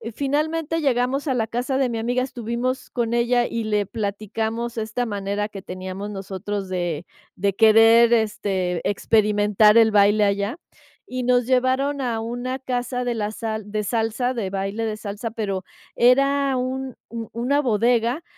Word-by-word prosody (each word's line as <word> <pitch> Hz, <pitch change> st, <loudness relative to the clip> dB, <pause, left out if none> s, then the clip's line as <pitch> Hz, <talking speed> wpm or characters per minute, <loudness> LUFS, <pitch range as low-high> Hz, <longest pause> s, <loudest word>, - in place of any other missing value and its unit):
finalmente 305 Hz, +3 st, -1 dB
llegamos 270 Hz, +1 st, 0 dB
a 265 Hz, -, +2 dB
la 235 Hz, -3 st, 0 dB
casa 245 Hz, +4 st, -2 dB
de 265 Hz, -2 st, +1 dB
mi 230 Hz, -, -3 dB
amiga, 245 Hz, +2 st, 0 dB
estuvimos 250 Hz, +1 st, -3 dB
con 235 Hz, -2 st, -2 dB
ella 240 Hz, 0 st, +2 dB
y 230 Hz, -1 st, -3 dB
le 210 Hz, -1 st, +1 dB
platicamos 220 Hz, +3 st, -3 dB
esta 220 Hz, +2 st, -2 dB
manera 205 Hz, 0 st, -2 dB
que 195 Hz, -2 st, -8 dB
teníamos 185 Hz, +2 st, -6 dB
nosotros 195 Hz, 0 st, -5 dB
de 175 Hz, -3 st, -2 dB, 0.3 s
de 200 Hz, +1 st, 0 dB
querer, 225 Hz, +2 st, +6 dB
este, 195 Hz, -5 st, 0 dB
experimentar 210 Hz, +1 st, +3 dB
el 225 Hz, -1 st, +6 dB
baile 205 Hz, 0 st, +4 dB
allá, 200 Hz, +5 st, 0 dB, 0.5 s
y 255 Hz, 0 st, -4 dB
nos 245 Hz, -1 st, +3 dB
llevaron 260 Hz, +3 st, +1 dB
a 235 Hz, -4 st, -1 dB
una 245 Hz, +3 st, -4 dB
casa 250 Hz, -1 st, -2 dB
de 245 Hz, -1 st, -1 dB
la 215 Hz, -2 st, -2 dB
sal 220 Hz, -2 st, -5 dB
de 210 Hz, 0 st, -2 dB
salsa, 230 Hz, +3 st, -1 dB
de 220 Hz, -6 st, -3 dB
baile 195 Hz, +3 st, -3 dB
de 215 Hz, -1 st, -2 dB
salsa, 215 Hz, +2 st, -5 dB
pero 195 Hz, -5 st, -3 dB, 0.3 s
era 275 Hz, +2 st, +3 dB
un 260 Hz, 0 st, -3 dB
u 230 Hz, -1 st, -6 dB
una 250 Hz, +5 st, +1 dB
bodega. 240 Hz, +3 st, +1 dB
230 Hz, 155 wpm, -23 LUFS, 205-250 Hz, 0.5 s, querer